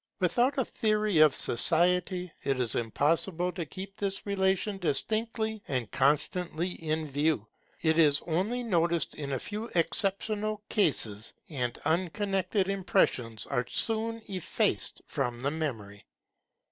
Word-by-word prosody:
Without 240 - +2
a 265 - +1
theory 215 -5 +1
of 155 -3 +6
society, 180 - +2
it 135 -2 0
is 120 -3 0
impossible 165 - 0
to 175 -4 -5
keep 195 +4 -8
this 195 -1 -3
relation 195 0 0
distinctly 220 +6 -1
and 125 -5 -2
constantly 160 +5 0
in 155 -2 -3
view. 145 -4 0 0.4
It 160 0 +3
is 145 -3 +5
only 195 +9 -1
noticed 170 -6 +1
in 140 -2 -5
a - - 0
few 210 - -5
exceptional 205 +4 +1
cases, 110 - +4 0.2
and 125 -6 -3
unconnected 185 +3 0
impressions 130 - 0
are 125 0 -2
soon 225 0 0
effaced 185 -4 -2
from 125 -2 -3
the 140 - +1
memory. 115 -11 -5
175 Hz, 125 wpm, -29 LUFS, 145-200 Hz, 0.4 s, of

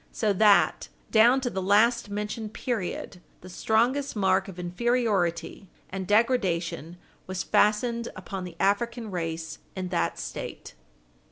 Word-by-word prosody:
So 215 -2 0
that, 205 +1 +4 0.2
down 240 +4 +5
to 250 - -1
the 190 - -3
last 215 +4 +3
mentioned 210 +1 -4
period, 195 -6 -4 0.2
the 185 - -11
strongest 240 +9 +1
mark 190 -1 +2
of 190 -2 -10
inferiority 180 -2 -1 0.2
and 190 -1 -4
degradation 190 - +1 0.3
was 185 -2 -3
fastened 235 +5 +2
upon 195 -2 -6
the 180 -2 -8
African 225 +3 0
race 165 -2 -4 0.2
in 185 -1 -4
that 175 - -1
State. - - -7
200 Hz, 125 wpm, -26 LUFS, 180-230 Hz, 0.3 s, down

